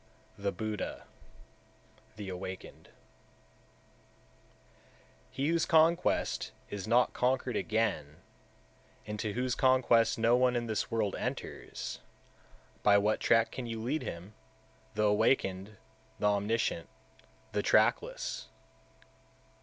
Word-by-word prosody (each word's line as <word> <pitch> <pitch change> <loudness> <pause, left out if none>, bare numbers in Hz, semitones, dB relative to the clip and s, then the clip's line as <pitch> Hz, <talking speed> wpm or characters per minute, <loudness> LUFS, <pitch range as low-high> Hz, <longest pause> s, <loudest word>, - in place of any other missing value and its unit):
The 100 0 -2
Buddha 110 -1 -4 1.1
(The 105 -2 -7
Awakened) 95 0 -7
179. - - -26 2.3
He 135 +3 -1
whose 170 -1 +1
conquest 165 +2 +2 0.2
is 100 -2 -5
not 120 +1 +3
conquered 125 -1 0
again, 105 -12 -1 0.9
into 105 0 -3
whose 125 +2 -1
conquest 130 -4 +3
no 115 +1 +4
one 125 0 +3
in 120 0 0
this 110 -2 -2
world 110 -3 0
enters, - - -5 0.8
by 100 -1 +6
what 105 +2 +2
track 115 -1 +3
can 125 -2 -5
you 115 -1 -4
lead 130 +8 -1
him, 90 +5 -7 0.6
the 105 - +1
Awakened, 105 -2 +1 0.4
the - - -2
Omniscient, 100 -4 -1 0.6
the - - 0
trackless? - - +1
110 Hz, 105 wpm, -31 LUFS, 100-125 Hz, 2.3 s, by